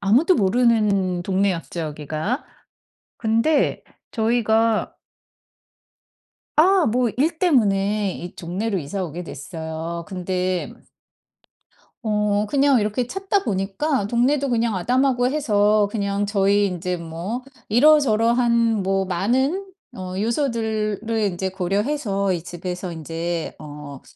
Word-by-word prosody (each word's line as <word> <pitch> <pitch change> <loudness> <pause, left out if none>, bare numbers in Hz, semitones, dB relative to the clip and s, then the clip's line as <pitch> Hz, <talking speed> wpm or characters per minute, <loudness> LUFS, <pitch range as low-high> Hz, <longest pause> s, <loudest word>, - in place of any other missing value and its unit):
아무도 250 - +4
모르는 205 - +2
동네였죠, 185 -2 -1
여기가. 155 - -3 0.7
근데 230 +7 +1 0.3
저희가 225 -1 +1 1.6
아, 365 +2 +5
뭐 240 +1 +1
일 315 +5 +1
때문에 210 - +2
이 175 +1 -8
동네로 190 +4 -3
이사 180 +6 -4
오게 170 +1 -6
됐어요. 160 +2 -6
근데 185 0 -2 1.3
어 210 -1 +1
그냥 280 -2 +4
이렇게 215 +4 -1
찾다 390 +5 -1
보니까 200 +4 -1
동네도 265 +5 +1
그냥 230 -3 +1
아담하고 250 +5 +2
해서 210 -7 +2
그냥 200 -1 -1
저희 200 0 +2
인제 180 -1 -3
뭐 170 +9 -5 0.3
이러저러한 235 -4 +4
뭐 195 0 +1
많은 260 - 0 0.3
어 185 -2 -6
요소들을 220 -4 -1 0.2
인제 190 -3 -1
고려해서 200 +2 -1
이 175 -3 -3
집에서 180 +1 -5
인제 165 +1 -4
어 145 -2 -9
205 Hz, 230 characters per minute, -22 LUFS, 185-240 Hz, 1.6 s, 아